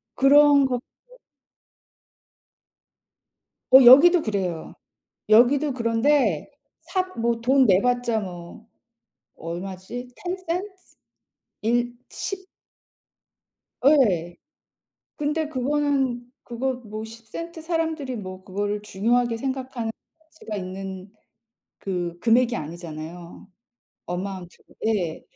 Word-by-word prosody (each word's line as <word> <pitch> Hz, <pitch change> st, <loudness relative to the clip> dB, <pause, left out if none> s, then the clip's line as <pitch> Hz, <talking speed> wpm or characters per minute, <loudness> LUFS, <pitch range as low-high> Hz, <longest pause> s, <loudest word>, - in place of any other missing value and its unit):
그런 285 Hz, +1 st, +6 dB
것도 250 Hz, -2 st, -1 dB, 2.9 s
어 265 Hz, +1 st, +9 dB
여기도 325 Hz, +7 st, +9 dB
그래요. 190 Hz, -, -3 dB, 0.6 s
여기도 260 Hz, +6 st, +5 dB
그런데 230 Hz, -, +1 dB, 0.3 s
사 370 Hz, -1 st, -1 dB, 0.2 s
뭐 230 Hz, 0 st, 0 dB
돈 265 Hz, +2 st, +4 dB
내봤자 240 Hz, +3 st, +2 dB
뭐 180 Hz, +2 st, -9 dB, 0.7 s
얼마지? 185 Hz, +8 st, -7 dB
10 -, -, -20 dB, 0.4 s
센트? 345 Hz, +3 st, -1 dB, 1.0 s
1 240 Hz, +2 st, 0 dB, 0.2 s
,10 380 Hz, -1 st, -5 dB, 1.4 s
예. 200 Hz, -, +3 dB, 0.8 s
근데 300 Hz, +1 st, -1 dB
그거는 270 Hz, -3 st, -1 dB
그거 255 Hz, +2 st, -2 dB
뭐 215 Hz, +1 st, -6 dB
10 225 Hz, 0 st, -12 dB
센트 335 Hz, +6 st, -7 dB
사람들이 320 Hz, -5 st, -2 dB
뭐 185 Hz, -3 st, -8 dB
그거를 205 Hz, +2 st, -3 dB
중요하게 230 Hz, +4 st, 0 dB
생각하는 260 Hz, -3 st, -4 dB, 0.4 s
수가 225 Hz, -9 st, -8 dB
있는 190 Hz, 0 st, -7 dB, 0.7 s
그 175 Hz, -3 st, -4 dB
금액이 240 Hz, +3 st, +3 dB
아니잖아요. 170 Hz, +1 st, -8 dB, 0.6 s
어마운트 180 Hz, 0 st, -6 dB, 0.3 s
예. 185 Hz, -8 st, -1 dB
235 Hz, 175 characters per minute, -24 LUFS, 190-270 Hz, 2.9 s, 어